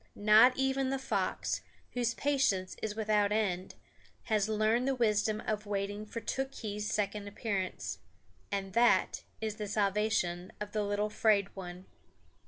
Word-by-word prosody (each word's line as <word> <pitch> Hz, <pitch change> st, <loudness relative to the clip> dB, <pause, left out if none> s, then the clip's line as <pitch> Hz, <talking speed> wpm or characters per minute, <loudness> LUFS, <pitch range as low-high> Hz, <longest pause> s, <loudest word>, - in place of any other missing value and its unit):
Not 215 Hz, +5 st, +6 dB
even 265 Hz, 0 st, +1 dB
the 270 Hz, -, 0 dB
fox, 265 Hz, -, -1 dB, 0.3 s
whose 240 Hz, -2 st, 0 dB
patience 260 Hz, -10 st, +1 dB
is 210 Hz, -1 st, -3 dB
without 210 Hz, -2 st, +2 dB
end, 190 Hz, -4 st, -1 dB, 0.5 s
has 215 Hz, -2 st, +1 dB
learned 220 Hz, +4 st, +2 dB
the 270 Hz, -, +2 dB
wisdom 215 Hz, -2 st, +1 dB
of 210 Hz, -1 st, -2 dB
waiting 205 Hz, +1 st, -3 dB
for 230 Hz, -, -5 dB
Tookhees' 220 Hz, -5 st, -3 dB
second 205 Hz, 0 st, -1 dB
appearance. 200 Hz, -2 st, -3 dB, 0.5 s
And 195 Hz, -1 st, -3 dB
that 235 Hz, 0 st, +3 dB, 0.2 s
is 215 Hz, -1 st, -3 dB
the 210 Hz, -, -4 dB
salvation 200 Hz, -3 st, 0 dB
of 210 Hz, 0 st, -5 dB
the 215 Hz, -, 0 dB
little 205 Hz, +1 st, -1 dB
'Fraid 205 Hz, -3 st, +2 dB
One. 180 Hz, -1 st, -8 dB
210 Hz, 140 wpm, -32 LUFS, 200-225 Hz, 0.5 s, Not